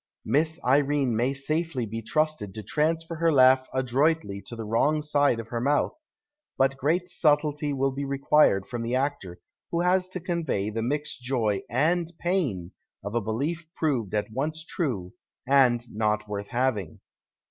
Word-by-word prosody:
Miss 160 +3 +1
Irene 140 -1 +2
may 120 +4 +1
safely 150 -1 -1
be 115 +1 -5
trusted 155 -6 -1
to 110 - -6
transfer 165 - -1
her 165 0 +3
laugh 130 -2 +5
adroitly 130 -4 0
to 120 - -6
the 115 -1 -6
wrong 145 +8 +1
side 145 -5 +2
of 115 0 -7
her 115 0 -3
mouth, 145 +3 +1 0.6
but 135 0 +3
great 165 +7 0
subtlety 150 -1 +1
will 135 0 0
be 140 +2 -4
required 140 -7 +3
from 120 -2 -5
the 115 +1 -3
aetor 130 -9 -1 0.4
wlio 170 +1 +1
lias 185 0 +2
to 185 0 -6
convey 160 - -2
the 115 +1 -2
mixed 145 +3 -3
joy 115 -6 0
and 165 +7 +1
pain 135 - -1 0.3
of 100 +1 -5
a 120 - +1
belief 145 +11 -3
j)roved 125 - 0
at 105 +1 -1
once 155 +6 -3
true 115 - -3 0.3
and 130 -3 +4
not 105 0 0
worth 100 -1 -4
having. 120 -9 -1
135 Hz, 160 wpm, -26 LUFS, 115-155 Hz, 0.6 s, laugh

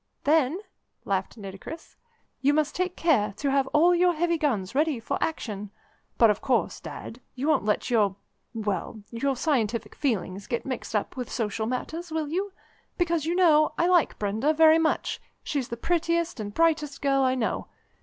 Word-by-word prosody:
"Then," 305 +2 +3 0.5
laughed 195 +3 -2
Nitocris, 200 - -9 0.5
"you 285 +2 +3
must 305 -1 +1
take 365 0 -1
care 215 -12 +2
to 280 -1 0
have 270 -1 +2
all 330 +6 +4
your 355 0 +4
heavy 340 +2 +1
guns 225 -10 0
ready 295 -2 +1
for 225 - -3
action. 210 -10 -3 0.5
But, 230 -2 +6
of 210 - -3
course, 255 - 0
Dad, 245 - -8
you 265 +3 -2
won't 310 -9 +2
let 215 +4 0
your 205 -5 +3 0.4
well, 210 0 -3
your 265 +4 -1
scientific 230 -6 0
feelings 200 -7 -2
get 235 -2 -2
mixed 255 -4 -4
up 210 - -1
with 250 -2 -5
social 220 -2 -2
matters, 320 +7 -4
will 315 -2 -2
you? 385 +5 -2 0.5
Because, 340 -3 0
you 340 - 0
know, 310 -4 +5
I 340 - +2
like 355 -3 +3
Brenda 220 +9 0
very 320 +1 +6
much; 320 -1 0 0.2
she's 275 -4 -2
the 235 - -5
prettiest 335 +1 0
and 205 -1 -4
brightest 300 +1 +1
girl 275 -1 +3
I 260 -1 +2
know. 240 -4 -2
275 Hz, 175 wpm, -26 LUFS, 225-320 Hz, 0.5 s, But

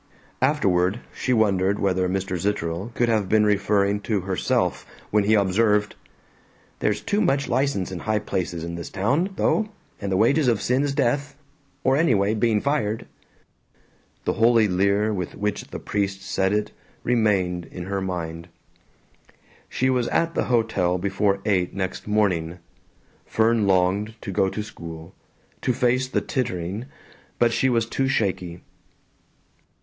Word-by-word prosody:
Afterward 90 +3 +2 0.2
she 125 - -2
wondered 100 -4 +2
whether 95 -2 +1
Mr. 95 0 -2
Zitterel 90 +2 -2
could 120 - +2
have 110 -4 +1
been 105 +1 +4
referring 100 0 +2
to 105 -2 -1
herself 95 0 0 0.3
when 105 -1 +3
he 110 +2 +4
observed, 105 +1 +2 0.9
"There's 105 0 0
too 205 - 0
much 140 +1 +1
license 125 -8 0
in 90 - -5
high 110 +4 0
places 85 -5 -3
in 85 0 -5
this 85 0 -6
town, 140 - 0
though, 215 +2 +1 0.3
and 100 -1 -3
the 95 - +2
wages 135 +7 +3
of 115 -4 +3
sin 125 +6 +1
is 140 -1 -1
death 140 +3 0 0.5
or 130 0 +3
anyway, 110 -10 +3
bein' 110 -1 +1
fired." 115 -7 -1 1.2
The - - +1
holy 115 -1 +4
leer 100 +3 +2
with 90 -4 -4
which 105 0 -2
the - - -7
priest 100 -1 -2
said 95 0 0
it 105 0 0 0.3
remained 100 -7 +1
in 90 - -8
her 100 +1 -3
mind. 85 -3 -4 1.2
She 130 +1 +1
was 125 -2 +1
at 165 0 +1
the - - 0
hotel 110 -7 +1
before 100 +1 0
eight 95 -5 +1
next 95 0 -4
morning. 90 -6 +1 0.7
Fern 110 -1 +2
longed 95 +4 +2
to 100 - -5
go 95 +1 +2
to 105 - -4
school, 85 -4 -9 0.5
to 125 - +1
face 130 +1 +1
the - - 0
tittering, 100 - -3 0.5
but 120 -1 +3
she 130 - +2
was 115 -2 +2
too 135 +3 -1
shaky. 90 -8 -1
105 Hz, 150 wpm, -24 LUFS, 95-115 Hz, 1.2 s, been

